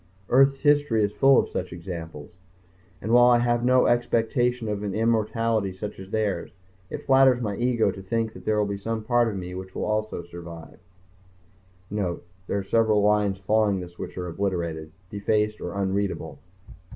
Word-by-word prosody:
Earth's 135 +1 +4
history 145 -7 +3
is 100 - 0
full 135 +4 +5
of - - +2
such 90 - -4
examples. 85 -2 -8 0.7
And 110 - -2
while 120 +1 +7
I 120 - +6
have 120 0 +1
no 125 0 +4
expectation 120 0 +1
of 105 -1 -2
an 100 -2 -3
immortality 110 -2 +1
such 105 +2 -7
as 95 0 -10
theirs, 105 -5 -1 0.4
it - - -7
flatters 135 -2 +5
my 105 -4 -2
ego 120 -1 +1
to 95 - -9
think 110 +3 -2
that - - -12
there 110 0 0
will 105 - +2
be 100 -1 -4
some 110 +2 -3
part 120 +1 +2
of 105 -3 -3
me 90 -1 -6
which 95 0 -8
also 110 0 -2
will 85 - -6
survive... 85 -1 -11 1.1
_(Note: 95 -5 -2 0.3
There - - -1
are 100 - -2
several 110 0 +2
lines 105 -2 +2
following 100 0 +1
this 90 -1 -10
which - - -7
are 90 - -3
obliterated, 85 -4 -3 0.2
defaced 105 +1 0
or - - -5
unreadable. 100 0 -2
105 Hz, 175 wpm, -25 LUFS, 95-115 Hz, 1.1 s, while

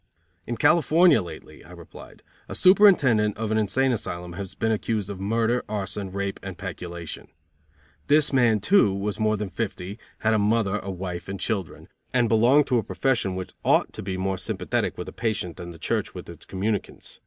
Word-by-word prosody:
"In 120 - -3
California 170 -1 +5
lately," 85 -4 -10
I - - -17
replied, - - -13 0.3
"A - - -5
superintendent 150 - +5
of 110 0 -3
an 110 - +2
insane 130 +6 +1
asylum 90 -6 -4
has 95 +1 -6
been 110 - 0
accused 105 -2 -1
of 95 - -7
murder, 115 +4 0
arson, 100 -2 -3
rape 100 0 -3
and 95 -3 -7
peculation. 85 -3 -7 0.8
This 150 0 +3
man, 120 -5 +3
too, 110 - +4
was 105 +2 -3
more 110 0 +2
than 100 -2 -4
fifty, 100 -1 -4 0.2
had 110 0 +2
a 110 - +3
mother, 105 -1 +1
a 95 - -7
wife 90 -1 -5
and 100 0 -5
children, 100 -7 -3 0.3
and 120 -2 +3
belonged 120 +6 +4
to 125 -3 +2
a - - -3
profession 105 -8 0
which 95 -1 -6
ought - - +2
to - - -6
be 95 -1 -4
more 95 0 -2
sympathetic - - -2
with - - -6
a - - -8
patient 105 -7 -3
than 85 - -7
the 85 - -10
church - - -2
with - - -8
its - - -12
communicants. 100 +2 -4
105 Hz, 190 wpm, -25 LUFS, 95-115 Hz, 0.8 s, California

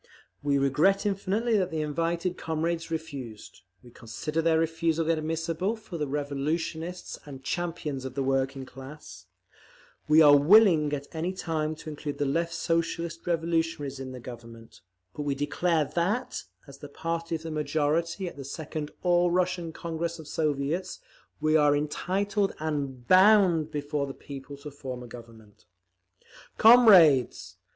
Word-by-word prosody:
We 145 -1 +1
regret 150 +10 +2
infinitely 205 +3 0
that 185 -1 0
the 160 -2 -2
invited 170 +4 -1
comrades 165 +1 -2
refused; 140 - -7 0.2
we 120 - -15
consider 150 +9 -4
their 165 0 +3
refusal 165 0 0
inadmissible 165 +5 -1
for 185 -8 -6
revolutionists 150 +5 -3
and 135 -2 -10
champions 160 -4 -3
of 130 -1 -7
the 140 - -1
working 135 0 -1
class; 130 - -12 0.8
we 155 +1 +6
are 145 -1 +8
willing 160 -1 +5
at 140 -1 -3
any 170 +3 -2
time 155 -4 -2
to 155 - -9
include 145 -1 -5
the 145 - 0
Left 165 +5 0
Socialist 165 0 -2
Revolutionaries 165 -4 -1
in 130 -1 -6
the 130 - -8
Government; 115 -1 -12 0.3
but 150 - -6
we 145 -1 -1
declare 155 +3 0
that, 210 - -2 0.2
as 140 -1 -13
the 145 - -9
party 165 +2 -3
of 160 - -6
the 165 - -5
majority 155 +4 -1
at 170 - -8
the 140 - -7
second 150 +2 -5
All 175 -1 +3
Russian 180 -1 0
Congress 170 +1 -4
of 160 -3 -11
Soviets, 155 +5 -2 0.4
we 155 +1 +2
are 145 -2 +5
entitled 195 +7 -1
and 140 -5 -4
BOUND 185 -5 +5
before 145 -1 -3
the 135 - -7
people 140 0 -9
to 145 +1 -9
form 130 -3 -7
a - - -10
Government….… 115 -4 -14 0.9
Comrades! 195 - +6
155 Hz, 145 wpm, -27 LUFS, 140-170 Hz, 0.9 s, are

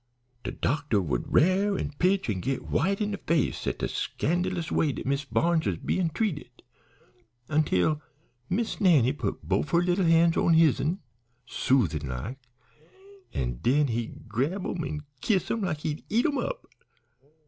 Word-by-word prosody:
De - - -3
doctor 145 -6 0
would 70 -10 -2
rare 195 +4 +3
an' 145 - -3
pitch 190 +2 +2
an' 100 -5 -1
git 130 +7 -2
white 195 +5 +1
in 210 -1 -1
de 200 - -4
face 165 -5 0
at - - -1
de - - -1
scandlous 175 +1 -1
way 155 - +2
dat - - -6
Miss 140 +1 0
Barnes 165 +2 +1
was - - 0
bein' 180 -3 0
treated, 170 -3 -3 0.9
until 150 - +2 0.5
Miss 225 +4 -1
Nannie 145 - +5
put 145 - -4
bofe 145 - 0
her 170 - +4
leetle 180 +1 +2
han's 165 0 +4
on 165 - +4
his'n, 160 +2 +3 0.4
soothin' 85 - +1
like, 100 - -5 0.9
an' - - -3
den 140 +3 +3
he'd 115 +1 -4
grab 140 - -1
'em 170 - -2
an' 150 0 -4 0.2
kiss 190 -5 +1
'em 230 - -1
like 165 -6 -2
he'd 155 -1 -3
eat 235 +3 +2
'em 290 -4 +1
up. - - -4
160 Hz, 160 wpm, -27 LUFS, 135-185 Hz, 0.9 s, Nannie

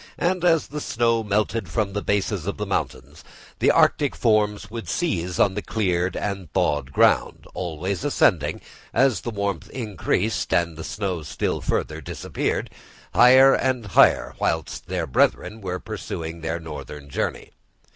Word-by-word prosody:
And 180 0 0
as 165 -3 +4
the 150 +1 -5
snow 115 -2 +1
melted 105 -1 -1
from 100 +3 -1
the 105 - -2
bases 100 -3 -1
of 100 - -3
the 105 - -3
mountains, 100 - -4 0.4
the - - +4
arctic - - +3
forms 105 -1 +1
would 115 -1 -6
seize 90 - -1
on 100 - +4
the 105 - -3
cleared 90 -5 -1
and 100 -6 -4
thawed 70 -2 0
ground, - - +2
always 90 +2 -3
ascending, - - +2 0.3
as 130 -1 +3
the - - -4
warmth 100 -5 -3
increased 110 - -2
and 85 -1 +1
the 80 - -7
snow 95 -4 -3
still 75 - -2
further 80 +1 -2
disappeared, - - -3 0.4
higher 130 +2 +7
and 130 -3 0
higher, 100 - +4
whilst - - -2
their - - -2
brethren 105 - +1
were 90 -2 -3
pursuing 80 0 -6
their 80 +1 -2
northern 75 -2 -8
journey. 70 - -3
100 Hz, 150 wpm, -23 LUFS, 85-115 Hz, 0.4 s, higher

